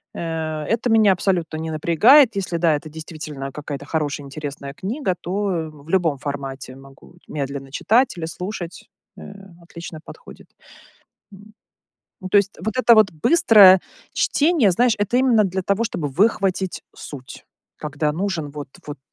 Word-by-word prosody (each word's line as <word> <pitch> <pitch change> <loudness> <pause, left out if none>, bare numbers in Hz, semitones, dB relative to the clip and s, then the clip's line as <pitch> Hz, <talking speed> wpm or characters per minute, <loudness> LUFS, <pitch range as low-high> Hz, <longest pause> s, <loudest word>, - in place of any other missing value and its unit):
Э, 160 -2 -4
это 235 +2 0
меня 220 -3 +5
абсолютно 175 -3 -1
не 160 0 -4
напрягает. 215 - +5
Если, 185 -3 -2
да, 165 -2 +3
это 150 +2 -7
действительно 155 -3 -7
какая-то 145 0 -7
хорошая, 145 -2 -3
интересная 140 -1 -7
книга, 195 - -3
то, 175 - -6 0.2
э, 165 -3 -3 0.2
в - - -15
любом 165 -5 +1
формате 135 -2 -6
могу 135 +4 -17
медленно 140 -2 -5
читать 235 - +2
или 165 - -4
слушать. 180 0 -7 0.3
Э, - - -11 0.4
отлично 170 -1 -9
подходит. - - -13 0.9
М, 205 +2 -15 0.7
ну, 185 - -6
то 205 - +3
есть 200 0 -1
вот 220 +1 -3
это 240 -2 +6
вот 215 -4 +5
быстрое 200 - +6 0.3
чтение, 295 - +2
знаешь, 240 +5 +2
это 205 +4 0
именно 245 -5 +4
для 190 0 -2
того, 200 +5 0
чтобы 160 -9 -3
выхватить 195 -1 0
суть, 135 -3 -10 0.3
когда 150 0 -2
нужен 170 -4 -3
вот 145 -1 -8 0.2
вот 145 -2 -6
170 Hz, 150 wpm, -21 LUFS, 150-205 Hz, 0.9 s, это